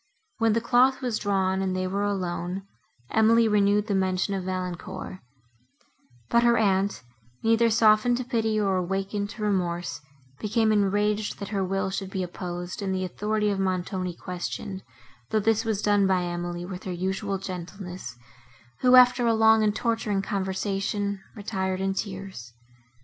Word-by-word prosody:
When 225 Hz, -1 st, +3 dB
the 230 Hz, -, +1 dB
cloth 260 Hz, +3 st, +3 dB
was 240 Hz, -4 st, -1 dB
drawn 190 Hz, -2 st, +1 dB
and 190 Hz, -1 st, -1 dB
they 185 Hz, 0 st, -1 dB
were 195 Hz, +2 st, -1 dB
alone, 185 Hz, -2 st, -2 dB, 0.5 s
Emily 225 Hz, +1 st, +4 dB
renewed 205 Hz, -1 st, +3 dB
the 210 Hz, -, -1 dB
mention 190 Hz, +1 st, 0 dB
of 190 Hz, -2 st, -3 dB
Valancourt; 185 Hz, 0 st, -5 dB, 1.1 s
but 235 Hz, -, +3 dB
her 235 Hz, 0 st, +4 dB
aunt, 200 Hz, -4 st, +1 dB, 0.4 s
neither 230 Hz, +1 st, +4 dB
softened 220 Hz, +2 st, +4 dB
to 255 Hz, -, -2 dB
pity, 225 Hz, -3 st, 0 dB
nor 195 Hz, -3 st, +1 dB
awakened 195 Hz, +3 st, -2 dB
to 210 Hz, +1 st, -7 dB
remorse, 175 Hz, -6 st, -1 dB, 0.4 s
became 220 Hz, +1 st, +1 dB
enraged, 205 Hz, +1 st, +1 dB
that 200 Hz, -, -6 dB
her 200 Hz, -2 st, -1 dB
will 190 Hz, +1 st, -1 dB
should 190 Hz, 0 st, -4 dB
be 190 Hz, -1 st, -2 dB
opposed, 175 Hz, +1 st, -5 dB
and 190 Hz, -1 st, -1 dB
the 185 Hz, 0 st, -1 dB
authority 210 Hz, +3 st, -1 dB
of 195 Hz, -, -2 dB
Montoni 185 Hz, -1 st, -2 dB
questioned, 180 Hz, +2 st, -5 dB, 0.5 s
though 215 Hz, -, +2 dB
this 225 Hz, +1 st, +2 dB
was 215 Hz, -3 st, -1 dB
done 205 Hz, -1 st, +3 dB
by 185 Hz, -1 st, +2 dB
Emily 175 Hz, 0 st, -4 dB
with 180 Hz, 0 st, -7 dB
her 185 Hz, -, -3 dB
usual 190 Hz, +3 st, -2 dB
gentleness, 180 Hz, -, -7 dB, 0.6 s
who, 250 Hz, 0 st, +5 dB
after 250 Hz, -1 st, +6 dB
a 230 Hz, -, +3 dB
long, 220 Hz, 0 st, +5 dB
and 210 Hz, -1 st, +2 dB
torturing 225 Hz, -5 st, 0 dB
conversation, 195 Hz, +1 st, -2 dB
retired 190 Hz, -3 st, -2 dB
in 195 Hz, 0 st, 0 dB
tears. 190 Hz, -, -6 dB
195 Hz, 155 wpm, -26 LUFS, 185-215 Hz, 1.1 s, after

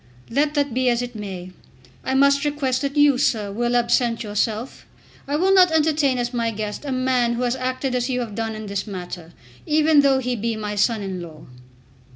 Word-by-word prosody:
"Let 295 Hz, +4 st, +1 dB
that 285 Hz, -3 st, 0 dB
be 255 Hz, +1 st, +2 dB
as 240 Hz, 0 st, +1 dB
it 245 Hz, 0 st, -6 dB
may, 190 Hz, -4 st, -7 dB, 0.5 s
I 265 Hz, -, -1 dB
must 280 Hz, +1 st, +4 dB
request 280 Hz, -3 st, -1 dB
that 280 Hz, +1 st, -3 dB
you, 290 Hz, -3 st, +5 dB
sir, 210 Hz, -6 st, 0 dB
will 240 Hz, +3 st, -1 dB
absent 235 Hz, -1 st, +1 dB
yourself. 215 Hz, +3 st, -3 dB, 0.4 s
I 285 Hz, -, -1 dB
will 375 Hz, +5 st, +3 dB
not 370 Hz, -2 st, +6 dB
entertain 300 Hz, -4 st, +2 dB
as 240 Hz, 0 st, -2 dB
my 230 Hz, -1 st, 0 dB
guest 210 Hz, +1 st, -5 dB
a 280 Hz, -, -3 dB
man 255 Hz, -2 st, +1 dB
who 245 Hz, -, -2 dB
has 245 Hz, 0 st, 0 dB
acted 255 Hz, 0 st, -2 dB
as 250 Hz, +1 st, -1 dB
you 250 Hz, -1 st, -1 dB
have 225 Hz, -3 st, -5 dB
done 225 Hz, 0 st, -3 dB
in 215 Hz, 0 st, -7 dB
this 200 Hz, +1 st, -4 dB
matter, 180 Hz, -3 st, -7 dB, 0.4 s
even 305 Hz, -1 st, +4 dB
though 275 Hz, -1 st, +3 dB
he 250 Hz, -1 st, -1 dB
be 230 Hz, +1 st, -2 dB
my 210 Hz, -1 st, -4 dB
son 210 Hz, +1 st, +1 dB
in 190 Hz, -2 st, -5 dB
law." 155 Hz, -3 st, -11 dB
245 Hz, 205 wpm, -22 LUFS, 215-275 Hz, 0.5 s, not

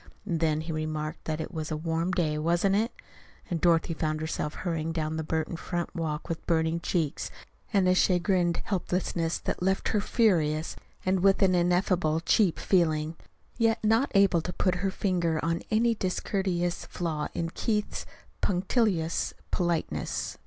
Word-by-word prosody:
And 170 Hz, -6 st, -1 dB
then 155 Hz, -1 st, +1 dB
he 160 Hz, +1 st, -5 dB
remarked 155 Hz, -1 st, -3 dB
that 155 Hz, 0 st, -2 dB
it 160 Hz, -, -5 dB
was 155 Hz, -2 st, -4 dB
a 155 Hz, -, -2 dB
warm 165 Hz, +2 st, -1 dB
day, 160 Hz, -4 st, +1 dB
wasn't 175 Hz, +5 st, +2 dB
it? 225 Hz, +4 st, +1 dB, 0.6 s
And 165 Hz, -2 st, -1 dB
Dorothy 165 Hz, -1 st, +3 dB
found 155 Hz, -1 st, -1 dB
herself 155 Hz, -1 st, -3 dB
hurrying 165 Hz, -2 st, -2 dB
down 160 Hz, -1 st, -2 dB
the 160 Hz, -, -2 dB
Burton 160 Hz, +1 st, -2 dB
front 175 Hz, 0 st, -3 dB
walk 155 Hz, -2 st, -3 dB
with 165 Hz, -2 st, -4 dB
burning 160 Hz, 0 st, +2 dB
cheeks 165 Hz, -4 st, -1 dB, 0.4 s
and 195 Hz, -3 st, +3 dB
a 185 Hz, -, +5 dB
chagrined 180 Hz, -1 st, +2 dB
helplessness 175 Hz, -3 st, -1 dB
that -, -, -4 dB
left 190 Hz, +1 st, +1 dB
her 210 Hz, -, +1 dB
furious 165 Hz, -9 st, +2 dB, 0.3 s
and 185 Hz, 0 st, +2 dB
with 195 Hz, +2 st, +4 dB
an 185 Hz, -1 st, +4 dB
ineffably 175 Hz, -2 st, +2 dB
cheap 190 Hz, -2 st, +3 dB
feeling 160 Hz, -3 st, +1 dB, 0.4 s
yet 225 Hz, 0 st, +3 dB
not 225 Hz, +5 st, +3 dB
able 195 Hz, -4 st, +5 dB
to 180 Hz, -, -4 dB
put 185 Hz, +1 st, +1 dB
her 195 Hz, -, +1 dB
finger 175 Hz, -5 st, 0 dB
on 165 Hz, 0 st, 0 dB
any 230 Hz, +2 st, +3 dB
discourteous 185 Hz, -3 st, -1 dB
flaw 155 Hz, -4 st, -2 dB
in 165 Hz, 0 st, -2 dB
Keith's 210 Hz, 0 st, -2 dB, 0.3 s
punctilious 185 Hz, -3 st, +1 dB, 0.2 s
politeness. 170 Hz, -3 st, -1 dB
170 Hz, 160 wpm, -28 LUFS, 160-190 Hz, 0.6 s, a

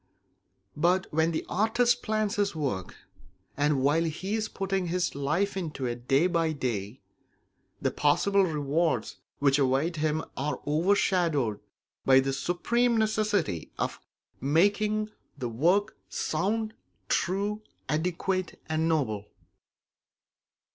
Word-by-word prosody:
But 175 Hz, +5 st, +2 dB
when 160 Hz, +1 st, +3 dB
the 160 Hz, -, -2 dB
artist 235 Hz, +4 st, +2 dB
plans 215 Hz, 0 st, -1 dB
his 200 Hz, -3 st, +1 dB
work, 125 Hz, -, -3 dB, 0.6 s
and 145 Hz, -2 st, +1 dB
while 155 Hz, +4 st, +3 dB
he 180 Hz, +6 st, -3 dB
is 220 Hz, -1 st, -1 dB
putting 195 Hz, -1 st, -2 dB
his 180 Hz, +1 st, 0 dB
life 155 Hz, +9 st, 0 dB
into 155 Hz, -8 st, -3 dB
it 120 Hz, 0 st, -4 dB
day 135 Hz, +5 st, +4 dB
by 165 Hz, -3 st, +1 dB
day, 120 Hz, -5 st, -3 dB, 0.8 s
the -, -, 0 dB
possible 195 Hz, +7 st, +3 dB
rewards 155 Hz, 0 st, 0 dB, 0.2 s
which 140 Hz, 0 st, +3 dB
await 140 Hz, +5 st, +1 dB
him 155 Hz, +1 st, 0 dB
are 145 Hz, +2 st, -2 dB
overshadowed 160 Hz, -, +2 dB, 0.4 s
by 130 Hz, 0 st, +6 dB
the 135 Hz, 0 st, 0 dB
supreme 235 Hz, -, +1 dB
necessity 215 Hz, -, 0 dB
of -, -, -2 dB, 0.4 s
making 205 Hz, -, +2 dB, 0.3 s
the 125 Hz, -3 st, -3 dB
work 175 Hz, -, +2 dB
sound, 215 Hz, +7 st, -1 dB, 0.3 s
true, 200 Hz, +4 st, 0 dB, 0.3 s
adequate, 180 Hz, +4 st, -1 dB
and 160 Hz, +1 st, 0 dB
noble. 110 Hz, -10 st, 0 dB
165 Hz, 115 wpm, -28 LUFS, 140-200 Hz, 0.8 s, by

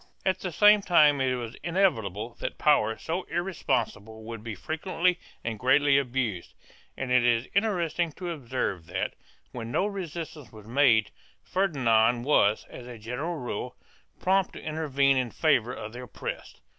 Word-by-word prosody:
2 -, -, +2 dB
At -, -, -10 dB
the 185 Hz, -, -4 dB
same 210 Hz, +5 st, +6 dB
time 150 Hz, -7 st, +5 dB
it 130 Hz, -1 st, +1 dB
was 120 Hz, -2 st, -5 dB
inevitable 120 Hz, -, 0 dB
that -, -, -4 dB
power 110 Hz, -7 st, +3 dB
so 170 Hz, +3 st, -3 dB
irresponsible 125 Hz, -, -2 dB
would 115 Hz, -1 st, -7 dB
be 110 Hz, -2 st, -5 dB
frequently 175 Hz, -, -1 dB, 0.2 s
and 115 Hz, -2 st, -4 dB
greatly 140 Hz, +2 st, +4 dB
abused, 120 Hz, -8 st, -3 dB, 0.4 s
and 130 Hz, -1 st, -3 dB
it 125 Hz, -1 st, +5 dB
is 120 Hz, 0 st, +2 dB
interesting 175 Hz, -5 st, 0 dB
to 180 Hz, +1 st, -5 dB
observe 120 Hz, -, -3 dB
that, -, -, -2 dB, 0.4 s
when 115 Hz, -2 st, -6 dB
no 185 Hz, -, +1 dB
resistance 170 Hz, -, -6 dB
was 110 Hz, -2 st, -13 dB
made, 115 Hz, -3 st, +3 dB, 0.3 s
Ferdinand 120 Hz, -, +2 dB
was, 110 Hz, -7 st, +3 dB
as 125 Hz, -, -10 dB
a 120 Hz, -1 st, -8 dB
general 125 Hz, +10 st, -4 dB
rule, 125 Hz, -3 st, -5 dB, 0.4 s
prompt 190 Hz, 0 st, +2 dB
to -, -, -8 dB
intervene 140 Hz, -3 st, +1 dB
in 125 Hz, -2 st, 0 dB
favor 125 Hz, -4 st, +2 dB
of 110 Hz, -3 st, -7 dB
the 125 Hz, -, -7 dB
oppressed. 125 Hz, -, -7 dB
130 Hz, 155 wpm, -27 LUFS, 115-170 Hz, 0.4 s, same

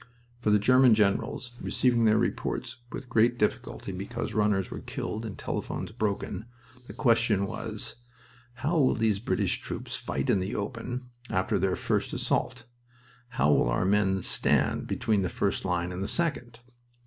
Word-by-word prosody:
For 115 Hz, -, 0 dB
the 105 Hz, -, +6 dB
German 125 Hz, +2 st, +6 dB
generals, 105 Hz, +4 st, 0 dB
receiving 120 Hz, -3 st, +2 dB
their 110 Hz, 0 st, +5 dB
reports 120 Hz, +2 st, -2 dB
with 130 Hz, -, -6 dB
great 120 Hz, 0 st, +3 dB
difficulty 105 Hz, -2 st, -1 dB
because 100 Hz, +6 st, -4 dB
runners 105 Hz, -3 st, +1 dB
were -, -, -5 dB
killed 110 Hz, +1 st, -4 dB
and 100 Hz, -, -7 dB
telephones -, -, -4 dB
broken, 110 Hz, -1 st, -2 dB, 0.4 s
the -, -, -8 dB
question 115 Hz, -5 st, +3 dB
was: 100 Hz, -, -5 dB, 0.6 s
"How 150 Hz, +7 st, 0 dB
will 135 Hz, -, +4 dB
these 110 Hz, -3 st, +1 dB
British 115 Hz, -, 0 dB
troops -, -, -5 dB
fight 70 Hz, -1 st, -1 dB
in 100 Hz, -, +3 dB
the 95 Hz, +3 st, -3 dB
open 125 Hz, +4 st, -4 dB, 0.2 s
after 95 Hz, +3 st, +1 dB
their 95 Hz, 0 st, +1 dB
first -, -, -1 dB
assault? 125 Hz, -2 st, -1 dB, 0.6 s
How 75 Hz, -, +2 dB
will -, -, +3 dB
our -, -, +1 dB
men 95 Hz, -1 st, +2 dB
stand -, -, +1 dB
between 105 Hz, -3 st, +1 dB
the 90 Hz, -, 0 dB
first 100 Hz, -, -1 dB
line 90 Hz, -1 st, 0 dB
and 90 Hz, +1 st, -5 dB
the 100 Hz, -, -2 dB
second?" 125 Hz, -9 st, -2 dB
110 Hz, 160 wpm, -28 LUFS, 95-120 Hz, 0.6 s, the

